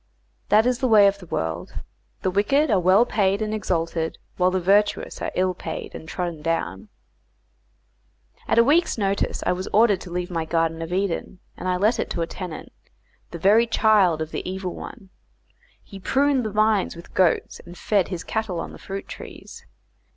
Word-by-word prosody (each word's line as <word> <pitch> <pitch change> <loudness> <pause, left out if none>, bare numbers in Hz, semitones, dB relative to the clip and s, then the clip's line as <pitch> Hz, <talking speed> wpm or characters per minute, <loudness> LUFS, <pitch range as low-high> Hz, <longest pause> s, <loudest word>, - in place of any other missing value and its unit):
That 215 +2 +5
is 250 0 +1
the 260 - +1
way 215 -3 +7
of 200 0 +2
this 180 -4 -13
world; 80 +2 -3 0.5
the 185 - +1
wicked 270 +9 +2
are 200 - +4
well 185 +6 +5
paid 200 -4 +1
and 215 -1 -2
exalted, 165 -5 -2 0.2
while 180 0 +3
the 185 0 0
virtuous 205 +3 +1
are - - -1
ill 185 0 +1
paid 165 -2 -6
and 160 - -9
trodden 175 -3 -4
down. 150 - -2 1.6
At - - +1
a 230 - +8
week's 310 +5 +2
notice 200 -2 -1
I - - +2
was 185 +1 -3
ordered 210 -3 +3
to 180 - -9
leave 180 +1 -3
my 165 -2 -1
Garden 165 0 -1
of 165 +1 -5
Eden, 190 0 -2 0.2
and 185 - -4
I 180 - +1
let 220 +5 +2
it - - -2
to 170 - -2
a - - -1
tenant, 175 -1 -8 0.6
the 170 - -7
very 210 +7 +4
child 200 -8 +3
of 160 - -10
the - - -3
Evil 185 -1 -4
One. 200 -7 -10 0.7
He 195 - -11
pruned 275 +5 +2
the 215 - -3
vines 215 -2 +2
with 170 - -13
goats 185 -3 +1
and 175 +1 -12
fed 200 -4 +1
his 180 -3 -5
cattle 220 -6 -3
on - - -5
the - - -12
fruit 195 0 -6
trees. - - -11
190 Hz, 190 wpm, -23 LUFS, 170-215 Hz, 1.6 s, a